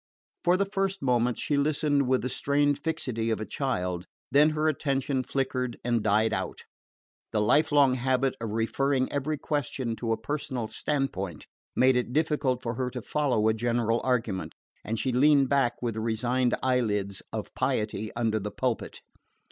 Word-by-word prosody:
For 175 Hz, +1 st, +4 dB
the 200 Hz, -, +2 dB
first 195 Hz, -2 st, -2 dB
moments 125 Hz, -2 st, +2 dB
she 145 Hz, -, 0 dB
listened 145 Hz, -1 st, +2 dB
with 130 Hz, 0 st, +2 dB
the 130 Hz, -, -1 dB
strained 145 Hz, +1 st, +1 dB
fixity 120 Hz, -8 st, -2 dB
of 110 Hz, -, 0 dB
a 110 Hz, -, -3 dB
child; 90 Hz, -11 st, -2 dB, 0.2 s
then 150 Hz, +2 st, +6 dB
her 155 Hz, 0 st, 0 dB
attention 135 Hz, -3 st, 0 dB
flickered 130 Hz, -2 st, -2 dB
and 120 Hz, -2 st, +2 dB
died 110 Hz, +2 st, +2 dB
out. -, -, -3 dB, 0.7 s
The 110 Hz, -, +1 dB
life 140 Hz, +11 st, +3 dB
long 140 Hz, -3 st, +5 dB
habit 130 Hz, +1 st, +1 dB
of 115 Hz, -, -3 dB
referring 130 Hz, +5 st, 0 dB
every 145 Hz, +2 st, -1 dB
question 135 Hz, -5 st, -2 dB
to 115 Hz, -2 st, -2 dB
a 110 Hz, -, +1 dB
personal 130 Hz, -1 st, -3 dB
standpoint 100 Hz, -, -3 dB, 0.3 s
made 130 Hz, 0 st, +5 dB
it 125 Hz, 0 st, -1 dB
difficult 145 Hz, -4 st, +1 dB
for 115 Hz, -, -2 dB
her 125 Hz, +1 st, -2 dB
to 125 Hz, 0 st, -6 dB
follow 125 Hz, -7 st, +1 dB
a 110 Hz, -, +4 dB
general 115 Hz, 0 st, 0 dB
argument, 115 Hz, -7 st, -1 dB, 0.3 s
and 115 Hz, +2 st, -2 dB
she 130 Hz, -, 0 dB
leaned 140 Hz, +1 st, +4 dB
back 135 Hz, -4 st, +2 dB
with 120 Hz, -2 st, 0 dB
the 110 Hz, -, -4 dB
resigned 120 Hz, +3 st, +1 dB
eyelids 105 Hz, -7 st, 0 dB
of 110 Hz, -1 st, -5 dB
piety 110 Hz, -4 st, -1 dB
under 115 Hz, -2 st, +1 dB
the 105 Hz, +1 st, -4 dB
pulpit. 125 Hz, +2 st, -3 dB
125 Hz, 170 wpm, -28 LUFS, 115-140 Hz, 0.7 s, then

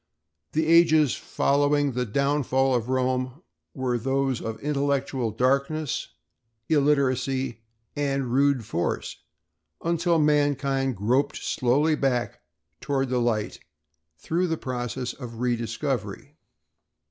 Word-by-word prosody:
The 160 Hz, +1 st, +1 dB
ages 160 Hz, -4 st, +5 dB
following 145 Hz, 0 st, +1 dB
the 125 Hz, 0 st, -2 dB
downfall 135 Hz, +1 st, +1 dB
of 120 Hz, -1 st, -1 dB
Rome 130 Hz, +3 st, -1 dB, 0.3 s
were 125 Hz, -3 st, -1 dB
those 135 Hz, +1 st, 0 dB
of 115 Hz, -1 st, -5 dB
intellectual 140 Hz, -4 st, 0 dB
darkness, 140 Hz, +5 st, 0 dB, 0.6 s
illiteracy, 135 Hz, -4 st, +1 dB, 0.4 s
and 135 Hz, -4 st, -1 dB
rude 140 Hz, -3 st, +2 dB
force 85 Hz, -5 st, -2 dB, 0.7 s
until 170 Hz, 0 st, +1 dB
mankind 140 Hz, -4 st, +1 dB
groped 120 Hz, +8 st, +1 dB
slowly 145 Hz, +4 st, +1 dB
back 130 Hz, -5 st, -1 dB, 0.4 s
toward 135 Hz, 0 st, -1 dB
the 125 Hz, -1 st, +1 dB
light 110 Hz, -3 st, -1 dB, 0.6 s
through 170 Hz, -, -1 dB
the 165 Hz, -1 st, -1 dB
process 125 Hz, -1 st, -4 dB
of 115 Hz, -4 st, -9 dB
rediscovery. 120 Hz, +1 st, -2 dB
135 Hz, 100 wpm, -25 LUFS, 125-145 Hz, 0.7 s, ages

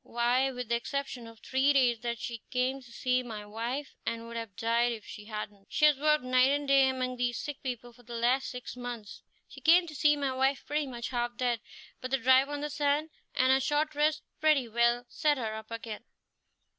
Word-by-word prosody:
Why, 245 Hz, +3 st, +1 dB
with 250 Hz, -2 st, -6 dB
the 235 Hz, -, +3 dB
exception 255 Hz, -1 st, -4 dB
of 230 Hz, 0 st, -13 dB
three 265 Hz, +2 st, +2 dB
days 245 Hz, -4 st, +3 dB
that 235 Hz, 0 st, -3 dB
she 230 Hz, 0 st, -6 dB
came 255 Hz, +2 st, 0 dB
to 245 Hz, -2 st, -16 dB
see 250 Hz, +1 st, +1 dB
my 220 Hz, -4 st, -7 dB
wife, 235 Hz, +7 st, -4 dB
and 230 Hz, 0 st, -3 dB
would 235 Hz, 0 st, -9 dB
have 225 Hz, -4 st, -5 dB
died 235 Hz, +1 st, +1 dB
if 220 Hz, -2 st, -9 dB
she 210 Hz, -2 st, -9 dB
hadn't, 210 Hz, -2 st, -7 dB
she 300 Hz, -, +3 dB
has 300 Hz, -1 st, +6 dB
worked 300 Hz, -1 st, +3 dB
night 255 Hz, +1 st, +4 dB
and 285 Hz, 0 st, 0 dB
day 275 Hz, -1 st, +5 dB
among 255 Hz, -1 st, -2 dB
these 245 Hz, -1 st, 0 dB
sick 290 Hz, -2 st, -5 dB
people 245 Hz, -2 st, -5 dB
for 245 Hz, -, -19 dB
the 240 Hz, 0 st, -9 dB
last 245 Hz, +3 st, +1 dB
six 250 Hz, -1 st, -7 dB
months. 245 Hz, -4 st, -7 dB, 0.3 s
She -, -, -13 dB
came 345 Hz, +1 st, +6 dB
to 320 Hz, -, -9 dB
see 295 Hz, +1 st, +4 dB
my 280 Hz, -2 st, -1 dB
wife 265 Hz, +1 st, +1 dB
pretty 295 Hz, 0 st, -1 dB
much 240 Hz, -2 st, -5 dB
half 240 Hz, -1 st, -2 dB
dead, 245 Hz, -2 st, 0 dB, 0.4 s
but 255 Hz, -, -4 dB
the 270 Hz, -, +2 dB
drive 260 Hz, +2 st, +5 dB
on 290 Hz, 0 st, -4 dB
the 295 Hz, 0 st, -3 dB
sand 295 Hz, +2 st, 0 dB, 0.2 s
and 255 Hz, +1 st, +4 dB
a 265 Hz, -, +5 dB
short 295 Hz, +3 st, 0 dB
rest 300 Hz, +1 st, +1 dB, 0.2 s
pretty 300 Hz, -5 st, +3 dB
well 235 Hz, +2 st, +2 dB
set 295 Hz, +2 st, +1 dB
her 225 Hz, -4 st, -3 dB
up 220 Hz, 0 st, -8 dB
again." 230 Hz, -1 st, -6 dB
250 Hz, 220 wpm, -30 LUFS, 235-280 Hz, 0.4 s, has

